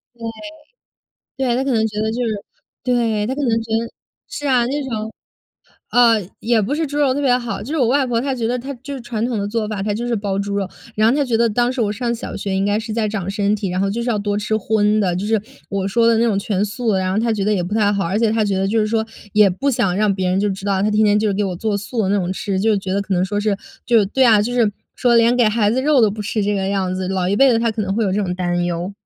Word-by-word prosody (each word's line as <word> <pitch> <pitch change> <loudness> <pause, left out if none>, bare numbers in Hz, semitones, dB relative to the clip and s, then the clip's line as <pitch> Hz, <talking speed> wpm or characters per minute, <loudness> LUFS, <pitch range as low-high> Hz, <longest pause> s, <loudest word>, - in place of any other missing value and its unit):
对， 235 - -22 1.3
对。 240 - +2
她 260 - 0
可 270 - -1
能 220 -2 +2
觉 210 0 -5
得 220 0 0
就 245 +2 -2
是 225 - -1 0.5
对， 230 -4 +1
她 260 - -2
可 290 - -3
能 260 - +1
觉 225 0 -9
得 230 0 -5 0.4
是 290 - -5
啊， 250 -3 +3
那 285 +4 -2
种 220 -4 -4 0.8
呃， 230 -6 +4
也 230 0 +2
不 215 +8 -1
是 320 +1 -1
猪 290 +1 -4
肉 280 -3 +3
特 285 - -1
别 260 -3 +3
好。 240 -4 -4
就 235 - -9
是 320 - -1
我 255 - +3
外 275 +2 +3
婆 235 -2 0
她 270 +1 -1
觉 235 -3 -2
得， 245 +2 -1
她 265 +3 -6
就 280 +1 -6
是 270 - -6
传 235 -2 -3
统 240 -3 -2
的 200 - -2
做 215 0 -2
法， 205 -3 -3
她 205 +1 -1
就 235 +3 -3
是 240 - 0
包 200 -2 -2
猪 200 0 -2
肉， 195 -1 -1 0.3
然 215 +1 +3
后 235 - +3
她 290 - +2
觉 240 -3 0
得 235 +1 +3
当 240 +3 +1
时 255 - -3
我 210 -2 +1
上 235 +2 -2
小 230 - -7
学， 200 -1 -3
应 190 +1 +1
该 205 +1 +1
是 220 0 -5
在 215 -1 0
长 200 -3 -4
身 205 0 +1
体， 200 -2 -3
然 180 +1 -2
后 195 - +1
就 235 +4 -2
是 240 - -1
要 215 - 0
多 205 0 -1
吃 210 +1 -1
荤 215 0 +1
的， 185 -4 +1
就 190 +3 -3
是 220 0 +1 0.3
我 195 -2 -2
说 230 +3 +2
的 230 -1 +4
那 235 - +3
种 210 -4 +1
全 200 -1 -1
素 220 +2 -2
的， 190 - +2
然 185 0 -1
后 205 - 0
她 230 0 +1
觉 205 -3 -1
得 210 - +2
也 185 -4 0
不 190 +5 -4
太 205 -2 +3
好， 200 -1 -1
而 190 +5 0
且 225 -2 +2
她 220 -1 +1
觉 200 -2 0
得， 190 - 0
就 220 +3 +1
是 215 - +1
说 220 0 0 0.3
也 210 -1 +6
不 270 +11 -1
想 230 -8 +1
让 210 -1 +2
别 190 -1 -1
人 185 - +1
就 205 - +1
知 195 0 -6
道， 195 -1 +1
她 210 - +2
天 215 +1 +3
天 210 0 +4
就 210 -1 +1
给 205 +1 0
我 190 -2 -2
做 215 +1 -1
素 215 +3 -3
的 190 - 0
那 200 - +2
种 185 -2 -1
吃， 190 0 -2
就 215 +2 +2
觉 190 -1 -3
得 200 - +1
可 195 -1 -2
能 180 +1 +2
说 205 +2 -2
是 205 -1 0 0.3
就 235 -1 +5
是 205 - +2
对 260 +6 +2
啊， 220 -3 +6
就 235 +4 -2
是 235 -4 +2 0.2
说 245 -1 +2
连 230 +1 +4
给 245 - +4
孩 215 -1 +2
子 255 +4 +1
肉 290 -1 +4
都 220 -3 +4
不 210 +2 -6
吃， 210 +1 -1
这 205 +1 0
个 195 -1 -1
样 190 -2 -1
子。 185 0 -3
老 185 -1 -1
一 200 - +1
辈 270 +2 +5
的， 225 - +2
她 230 0 +1
可 220 0 -4
能 195 -1 -2
会 225 - 0
有 190 - 0
这 205 - 0
种 180 -2 -2
担 175 -1 -1
忧。 175 +2 -3
215 Hz, 340 characters per minute, -19 LUFS, 200-235 Hz, 1.3 s, 也